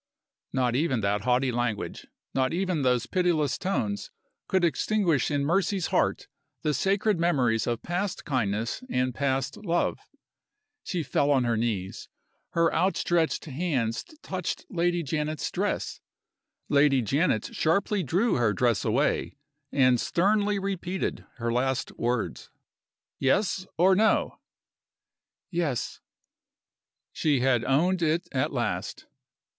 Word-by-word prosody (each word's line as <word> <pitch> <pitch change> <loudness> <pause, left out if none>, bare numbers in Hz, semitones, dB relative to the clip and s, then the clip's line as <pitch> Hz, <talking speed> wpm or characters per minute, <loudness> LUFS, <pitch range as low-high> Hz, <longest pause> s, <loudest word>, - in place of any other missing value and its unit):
Not 125 -2 +1
even 130 -5 +1
that 100 +1 0
haughty 125 +1 +2
language, 120 -3 -3 0.3
not 130 +2 +1
even 180 -3 0
those 125 -2 +2
pitiless 170 -3 +1
tones, 110 - -2 0.4
could 190 -1 +1
extinguish 170 - +1
in 145 -1 0
Mercy's 190 +3 +1
heart - - +1 0.4
the 150 - +1
sacred 195 +2 +1
memories 130 -10 +2
of 120 -1 -2
past 180 +2 -3
kindness 115 - -1
and 125 - 0
past 135 0 -1
love. 175 -4 0 0.8
She 175 -4 -2
fell 145 -1 +1
on 135 -3 +4
her 120 -1 +1
knees 110 -5 -3 0.4
her 170 0 +3
outstretched 175 -2 +1
hands 135 -7 -1 0.2
touched 185 -2 -4
Lady 175 0 +1
Janet's 150 0 -2
dress. - - -2 0.7
Lady 140 -3 +4
Janet 135 - 0
sharply 200 +5 +1
drew 180 - +1
her 115 -3 +2
dress 115 0 +1
away, - - 0 0.3
and 130 -3 +4
sternly 205 +3 +2
repeated 190 -2 -3
her 115 -1 -2
last 130 +1 0
words. 120 -1 -2 0.7
"Yes? 185 +7 +1
or 185 +3 +5
No?" 220 +3 +2 1.1
"Yes." 165 -8 -2 1.1
She 145 -5 +1
had 125 -3 +3
owned 175 +7 +2
it 165 +1 +1
at 130 - 0
last! - - -3
145 Hz, 120 wpm, -27 LUFS, 125-180 Hz, 1.1 s, or